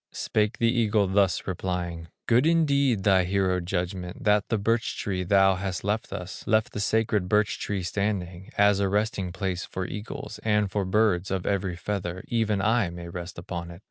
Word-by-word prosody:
Spake 105 0 0
the 115 0 +3
eagle, 110 -4 +2
thus 95 -2 +2
replying: 90 -2 -3 0.2
"Good 125 +6 +4
indeed, 140 - +3
thy 95 -2 +4
hero 95 0 +1
judgment, 90 0 -4
That 105 -1 +2
the 115 - +1
birch 115 +3 0
tree 95 -2 -2
thou 95 +1 +4
hast 95 -1 -3
left 105 +2 -1
us, 90 +1 -6
Left 110 0 +2
the - - -4
sacred 105 -3 +1
birch 105 0 +2
tree 100 -3 -2
standing, 95 0 -2
As 100 -1 +4
a 100 -1 +1
resting 105 -2 0
place 95 -1 -3
for 95 - -4
eagles, 105 +1 -7
And 105 -2 +1
for 100 -1 -1
birds 95 -2 +2
of 95 -1 -2
every 95 -3 -1
feather, 90 0 -4
Even 110 -4 +1
I 110 -3 +2
may 85 0 -8
rest 85 +1 -7
upon 85 0 -5
it." 85 0 -10
100 Hz, 180 wpm, -26 LUFS, 90-105 Hz, 0.2 s, Good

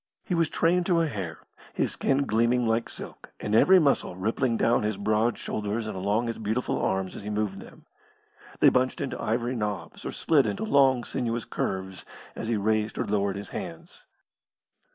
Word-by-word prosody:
He 180 - -3
was 165 -2 +2
trained 175 +1 +2
to 170 -3 +3
a - - +2
hair, 95 - -6 0.3
his - - 0
skin 140 +1 +1
gleaming 120 +2 +2
like 115 +1 0
silk, - - -7
and 105 - -3
every 185 +12 +7
muscle 140 - +2
rippling 115 +5 0
down 120 +2 +3
his 105 -1 -1
broad 110 +3 +1
shoulders 105 +2 -3
and 110 - -5
along 100 +5 0
his 115 -1 -4
beautiful 110 +3 -1
arms 95 -1 -1
as - - -7
he 105 - -6
moved 105 -2 -2
them. - - -14 0.8
They - - +8
bunched 130 0 +1
into 135 - -4
ivory 120 +3 -1
knobs, 105 -3 -4
or - - -4
slid 150 -5 +2
into 200 +2 -2
long, 135 - +4
sinuous 115 -1 -2
curves, 95 -1 -3 0.3
as - - -5
he 115 -1 +1
raised 110 +1 0
or - - -1
lowered 100 -1 0
his 100 -2 -6
hands. - - -8
110 Hz, 185 wpm, -27 LUFS, 105-130 Hz, 0.8 s, They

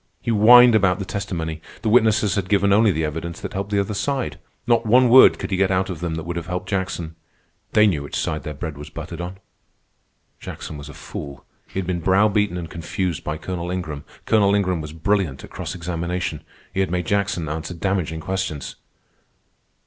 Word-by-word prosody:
He 115 - -2
whined 120 +3 +8
about 100 -4 +3
the 100 - -4
testimony. 85 -6 -4 0.2
The 110 - +1
witnesses 110 -3 +4
had 95 -2 -2
given 100 -1 +3
only 110 0 +5
the 80 -2 -1
evidence 80 +2 -5
that - - -6
helped 100 +1 -3
the 100 - 0
other 100 +2 -1
side. 135 +4 -2 0.3
Not 120 -1 +3
one 125 +3 +5
word 130 +2 +8
could - - -5
he 95 - +1
get 95 0 +2
out 95 0 0
of 85 - -6
them 85 -1 -3
that 80 - -4
would 85 +1 -4
have 85 - -5
helped 90 +1 -4
Jackson. 95 -4 -2 0.6
They 105 0 +6
knew 85 -9 +1
which 70 - -7
side 80 0 -1
their 75 - -6
bread 75 0 -6
was 75 +1 -8
buttered 80 +1 -7
on. 90 +2 -6 1.0
Jackson - - -7
was 70 0 -9
a 75 - -11
fool. 70 -2 -8 0.2
He - - -9
had 95 - -3
been 90 -1 -1
brow 95 +5 +4
beaten 105 -3 0
and 85 -2 -5
confused 85 +1 -3
by 75 0 -3
Colonel 90 +1 -5
Ingram. 80 -5 -4 0.2
Colonel 100 -2 +4
Ingram 95 -4 0
was 75 -1 -7
brilliant 80 -4 -1
at - - -11
cross - - -5
examination. 85 -1 -3 0.3
He - - -2
had 95 - +1
made 90 0 -1
Jackson 100 -4 0
answer 80 +3 -4
damaging 85 -3 -1
questions. 95 -5 -4
90 Hz, 205 wpm, -22 LUFS, 80-100 Hz, 1.0 s, whined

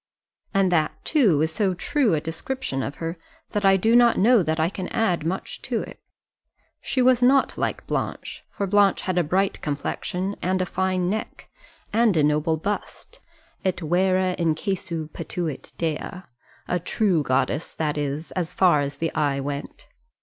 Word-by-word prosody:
And 195 -2 +2
that, 155 -3 +2
too, 205 - +3
is 160 - 0
so 190 +2 0
true 250 - +1
a - - +1
description 165 - -4
of 140 - -4
her, 165 +1 -5 0.3
that 210 - -1
I 195 0 +6
do 225 +5 +3
not 240 -1 +6
know 230 +2 +5
that 160 -1 -1
I 160 - +3
can 185 0 -5
add 185 -8 0
much 180 +4 -4
to - - -2
it. - - -11 0.8
She 255 - 0
was 250 -1 +4
not 265 +2 +4
like - - -2
Blanche; - - -4
for 200 - -3
Blanche 200 0 +3
had 185 -1 0
a - - +3
bright 190 +5 0
complexion, 180 +6 -3
and 185 +1 0
a 185 - +1
fine 185 -1 0
neck, 215 +4 -4 0.4
and 220 -5 +3
a 150 - +4
noble 150 +2 +2
bust, 205 +6 -5 0.4
et 185 -2 0
vera 185 +2 +1
incessu 170 0 -1
patuit 165 -3 -5
Dea 160 -3 -1 0.7
a 180 - 0
true 180 -1 +1
goddess, 135 +3 -1
that 150 -2 -1
is, 145 +2 -3
as 175 -3 -3
far 175 -6 +4
as 140 0 -4
the 165 0 -2
eye 145 -3 +1
went. 140 +1 -5
180 Hz, 170 wpm, -24 LUFS, 155-195 Hz, 0.8 s, I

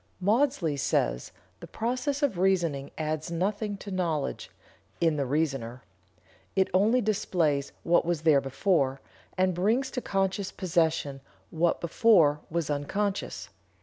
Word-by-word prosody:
Maudsley 205 - +1
says: 65 - 0 0.3
"The - - -10
process 255 +5 -2
of 230 -11 +1
reasoning 170 -7 +1
adds 155 +1 -3
nothing 200 +4 -2
to 200 +1 -9
knowledge 170 -6 -2 0.5
(in 165 -2 +2
the 140 -3 -1
reasoner). 135 -5 -2 0.7
It 190 -1 +2
only 215 +7 +4
displays 170 -9 0
what 170 +1 +3
was 170 -2 -2
there 150 -4 +5
before, 135 0 0 0.4
and 185 0 +2
brings 225 +10 +1
to 250 - -3
conscious 195 -1 -1
possession 160 -6 0 0.3
what 165 +1 +1
before 170 -5 +4
was 170 -2 -1
unconscious." 190 +8 -2
175 Hz, 125 wpm, -28 LUFS, 150-200 Hz, 0.7 s, there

